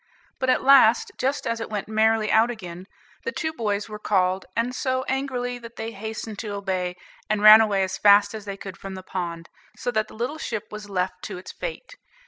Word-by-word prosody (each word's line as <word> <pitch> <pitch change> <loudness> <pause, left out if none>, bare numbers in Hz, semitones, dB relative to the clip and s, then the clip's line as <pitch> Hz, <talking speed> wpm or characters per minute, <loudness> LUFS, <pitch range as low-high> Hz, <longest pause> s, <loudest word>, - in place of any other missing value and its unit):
But 260 - 0
at - - +3
last, 260 -4 +6
just 275 +2 -1
as 230 0 -1
it 225 - -5
went 210 -2 -4
merrily 220 0 +2
out 225 +2 +4
again, 185 -5 -8 0.4
the 465 - -2
two 315 -6 -3
boys 210 -6 -2
were 210 -1 -8
called, 190 -2 +1
and 235 +2 0
so 260 0 -1
angrily, 255 -2 -2
that 235 0 -11
they 225 +1 -5
hastened 220 0 -6
to 210 -3 -4
obey, 185 -3 -2 0.3
and 215 -1 0
ran 215 +1 +11
away 200 -3 +2
as 190 0 -3
fast 205 0 +6
as 215 -1 -7
they 200 -1 -5
could 195 -2 -8
from 195 -1 -8
the 185 - -8
pond, 170 -3 -5 0.3
so 245 - -2
that 215 -2 0
the - - -14
little 250 +8 -3
ship 220 -7 -4
was 210 -1 -8
left 185 -1 -2
to - - -6
its 180 - -9
fate. - - -7
215 Hz, 215 wpm, -24 LUFS, 195-240 Hz, 0.4 s, ran